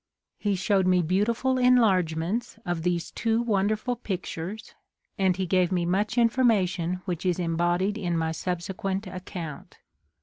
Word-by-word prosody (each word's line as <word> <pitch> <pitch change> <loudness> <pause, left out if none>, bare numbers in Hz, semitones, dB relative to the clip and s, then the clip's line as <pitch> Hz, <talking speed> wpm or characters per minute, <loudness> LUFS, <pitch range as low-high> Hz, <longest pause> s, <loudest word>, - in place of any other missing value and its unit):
He 205 -2 0
showed 190 +1 +2
me 180 -1 +4
beautiful 225 +9 +1
enlargements 205 -5 +2
of 175 -2 -2
these 175 0 -1
two 225 0 0
wonderful 215 +1 0
pictures, 195 -1 -5 0.5
and 190 -2 +2
he 190 - -1
gave 180 0 +2
me 175 -2 +1
much 205 +6 0
information 185 -8 +2
which 175 -4 -3
is 180 -2 +1
embodied 175 +4 0
in 175 -4 -1
my 160 0 0
subsequent 190 +4 -3
account. 180 -4 -7
185 Hz, 135 wpm, -26 LUFS, 175-215 Hz, 0.5 s, me